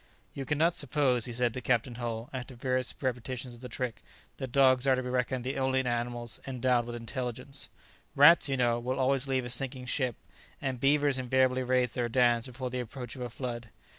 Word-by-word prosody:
"You 135 - -5
cannot 155 +5 +2
suppose," 135 -5 +2
he 120 - -3
said 120 0 +1
to 130 - -4
Captain 125 0 +1
Hull, 115 -1 -4
after 130 0 -6
various 130 +1 -1
repetitions 125 -1 -3
of 120 - -13
the 125 - -7
trick, 125 0 -4 0.4
"that 130 -2 -5
dogs 130 -1 +4
are 130 - +5
to 130 - -2
be 125 - -4
reckoned 125 0 -1
the 135 +2 -2
only 130 0 +1
animals 120 -1 -2
endowed 125 -2 +1
with 120 - -5
intelligence 125 +3 -3 0.5
Rats, 150 +2 +7
you 135 - 0
know, 120 -1 +2
will 125 +2 -2
always 135 0 +2
leave 130 -2 0
a - - -4
sinking 130 +1 -1
ship, 125 -2 0 0.4
and 130 -3 -3
beavers 140 0 +3
invariably 130 0 +2
raise 125 -1 +1
their 120 -1 -1
dams 120 0 +3
before 125 0 -5
the 125 - -2
approach 125 0 -6
of 130 - -8
a 125 - -3
flood. 120 -1 -5
125 Hz, 200 wpm, -30 LUFS, 120-130 Hz, 0.5 s, Rats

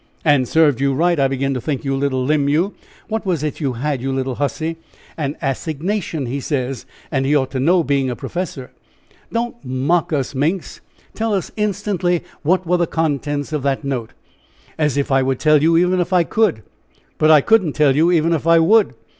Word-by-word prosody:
"And 145 -5 +3
served 150 -4 +3
you 140 -1 +1
right, 170 +2 +2
I 135 - +4
begin 135 +1 -1
to 125 - -3
think, 145 -1 -3
you 135 0 0
little 135 -2 -1
limb, 145 0 +1
you. 170 +8 +1 0.3
What 220 0 -3
was 175 -7 -1
it 150 - -3
you 140 -5 -1
had, 135 +2 -2
you 135 +1 -2
little 130 0 -2
hussy?" 160 +3 -2 0.4
"An 145 -2 -3
assignation, 160 +3 -2
he 130 +4 -3
says, 130 -3 -3 0.2
and 135 -3 0
he 140 +3 +2
ought 130 -3 +1
to 130 - -3
know 170 +6 +3
being 140 -3 0
a 125 - -3
professor." 160 -4 -5 0.6
"Don't 235 +1 -3
mock 135 +8 0
us, 140 -3 -1
Minx! 160 +7 -2 0.3
Tell 220 -1 -1
us 190 - -3
instantly 200 -4 -1 0.2
what 185 +4 +1
were 180 +2 +2
the 170 -1 +1
contents 145 -2 -2
of 150 - -1
that 140 +1 -1
note?" 130 -5 -4 0.6
"As 150 -3 0
if 140 0 -1
I 135 0 +4
would 130 0 0
tell 155 -2 +4
you 165 +2 +4
even 180 +1 +2
if 175 +1 -1
I 180 -2 +5
could. 190 - 0 0.6
But 155 - +4
I 155 -2 +7
couldn't 190 -5 +3
tell 145 -3 +3
you 165 +4 +3
even 165 -1 +2
if 165 0 -2
I 165 0 +6
would. 205 +7 +4
150 Hz, 205 wpm, -19 LUFS, 135-175 Hz, 0.6 s, I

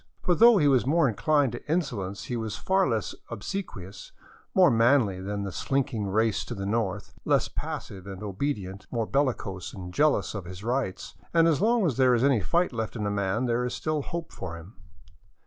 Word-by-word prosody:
For 180 - +3
though 230 +4 +7
he 150 -5 +4
was 130 -3 +3
more 150 -5 +3
incHned 145 +3 +2
to 120 +5 -6
insolence, 105 - -2
he 125 - -4
was 110 -3 -3
far 190 -4 +1
less 110 -3 -1 0.2
obsequious, 115 - -6 0.4
more 180 -5 +6
manly 115 -5 +3
than 100 +1 -3
the 100 - -4
slinking 120 -3 -1
race 110 +2 +1
to 120 - -6
the 100 -1 -4
north, 105 -2 -2
less - - +2
passive 95 -1 -6
and 95 +1 -7
obedient, 100 -3 -4
more 115 -2 -1
bellicose 110 -9 -1
and 90 -2 -8
jealous 150 +5 +2
of 100 -4 -5
his 90 +2 -9
rights; 120 -5 -2 0.2
and 165 0 +6
as 160 -1 +2
long 230 0 +3
as 145 -9 0
there 130 -2 +5
is 120 - +1
any 135 -6 +3
fight 170 - +1
left 110 0 -3
in 105 -3 -3
a 105 - 0
man, 100 +4 0
there 120 0 +1
is 125 - -2
still 155 -1 -1
hope 170 +3 -5
for 85 -3 -6
him. 85 +6 -12
115 Hz, 200 wpm, -27 LUFS, 100-145 Hz, 0.4 s, though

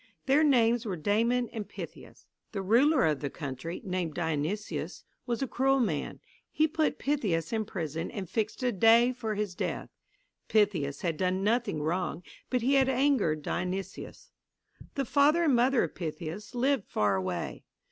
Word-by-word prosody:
Their 280 +3 +4
names 240 -5 +4
were 200 -6 -3
Damon 230 +8 +1
and 215 -3 -6
Pythias. - - -10 0.3
The 195 -2 -3
ruler 260 +8 +4
of 150 -3 +1
the 145 - -3
country, 145 +3 -6
named 180 -4 -2
Dionysius, 165 +5 -3 0.2
was 240 +2 -1
a - - -1
cruel 270 +2 +2
man. 175 - -1 0.3
He 310 - +2
put 310 0 0
Pythias 210 - -1
in 220 -1 0
prison 165 -5 -4
and 200 -6 -5
fixed 220 +6 -2
a 250 - +2
day 230 +4 +5
for 220 -3 -3
his 205 -2 -2
death. - - -3 0.6
Pythias 180 -10 +1
had 165 -3 -1
done 185 +2 0
nothing 215 -8 0
wrong, 175 +1 -2 0.3
but 250 -2 0
he 265 +3 +3
had 265 -1 +4
angered 250 - +2
Dionysius. 190 - -4 0.6
The 275 - -1
father 295 +6 +4
and 300 -5 +3
mother 250 +2 +3
of - - -4
Pythias 170 +6 -6
lived 260 -2 +1
far 105 -2 +1
away. 95 -2 -3
210 Hz, 160 wpm, -29 LUFS, 170-255 Hz, 0.6 s, day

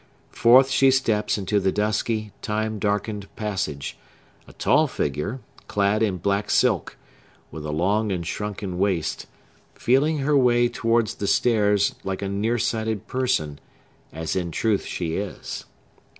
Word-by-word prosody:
Forth 130 +3 +5
she 135 0 +5
steps 115 -6 +1
into 100 +1 0
the 95 -1 +1
dusky, 110 +1 -1
time 110 0 -2
darkened 105 0 -2
passage; 95 -10 -3 0.5
a - - -14
tall 150 +3 +3
figure, 85 - -3 0.3
clad 100 +1 +1
in 100 -4 +1
black 100 +3 -1
silk, - - +1 0.5
with 75 -1 -6
a - - -3
long 100 +7 +1
and 90 -3 -2
shrunken 95 +1 -4
waist, 95 -5 -1 0.5
feeling 145 +6 +2
her 145 +1 +1
way 120 -2 +4
towards 115 -2 +1
the 100 - -4
stairs 105 -4 +3
like 95 0 -3
a 100 - -2
near 105 +4 0
sighted 110 -2 -1
person, 125 - -1 0.5
as 80 +1 -4
in 90 -2 -1
truth 105 +5 0
she 85 -2 -3
is. 100 -1 -5
105 Hz, 140 wpm, -24 LUFS, 95-115 Hz, 0.5 s, Forth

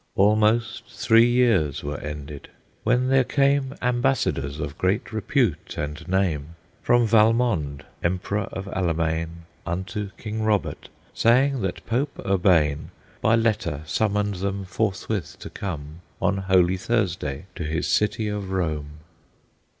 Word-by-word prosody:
Almost 110 +3 +2
three 115 0 +4
years 115 - +2
were 75 0 -4
ended; 75 -1 -7 0.3
when 125 +2 +2
there 135 -1 +5
came 140 +1 +1
Ambassadors 120 - 0
of 70 0 -5
great 95 +4 0
repute 110 - 0
and 75 +3 -5
name 85 -5 0 0.3
From 120 -1 +3
Valmond, 110 - +2 0.2
Emperor 95 +3 -1
of 95 - -5
Allemaine, 85 -2 -1 0.2
Unto 95 +4 -4
King 110 0 -4
Robert, 110 -2 -1 0.2
saying 130 +3 +3
that 95 -2 -3
Pope 125 +6 -1
Urbane 85 -7 +2 0.3
By 110 - +4
letter 110 -10 0
summoned 105 +5 0
them 100 +1 -3
forthwith 95 -4 -2
to - - -9
come 80 -4 -6 0.2
On 100 - +1
Holy 95 -1 +3
Thursday 90 -8 -1
to - - -5
his 80 +3 -2
city 105 +1 +1
of 105 -2 -3
Rome. 75 -5 -3
95 Hz, 125 wpm, -24 LUFS, 80-115 Hz, 0.3 s, there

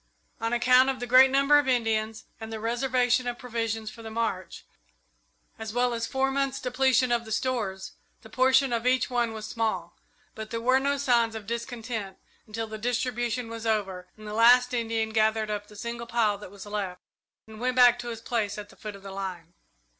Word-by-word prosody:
On 230 0 -2
account 250 +2 +5
of 265 -1 -2
the 245 - -3
great 255 +2 +7
number 275 +2 +5
of 290 - -1
Indians 225 -3 0
and 225 0 -7
the 220 - -5
reservation 245 +2 +1
of 240 0 -3
provisions 225 -3 -3
for 230 - -12
the 225 - -7
march, 220 -5 -3 0.9
as 220 -1 -6
well 245 0 +1
as 230 -1 -2
four 265 0 0
months' 275 0 -1
depletion 255 0 +2
of 235 -1 +1
the 220 - -10
stores, 215 -5 -2 0.3
the - - -11
portion 260 +2 +3
of 235 +1 -1
each 255 0 +2
one 240 -2 +1
was 220 -1 -7
small; 215 -6 -2 0.4
but 220 0 -7
there 230 - -3
were 255 +3 +3
no 280 +1 0
signs 235 -5 +2
of 220 -2 -7
discontent 230 -3 -5 0.3
until 225 +1 -4
the 215 0 -8
distribution 240 0 -1
was 230 0 -6
over 195 -4 -1
and 215 - -12
the 210 - -5
last 245 +3 +5
Indian 225 -2 -1
gathered 220 0 +1
up 205 0 -4
the 210 - -15
single 235 +2 -6
pile 220 -4 +1
that 205 - -10
was 200 +1 -11
left 200 -3 -4 0.5
and 220 -1 -12
went 250 0 0
back 245 -1 +6
to 240 - -6
his 225 -1 -6
place 220 -4 -2
at 205 -1 -8
the - - -17
foot 210 -1 -8
of 195 - -14
the 195 - -8
line. 185 -4 -6
230 Hz, 205 wpm, -27 LUFS, 215-250 Hz, 0.9 s, great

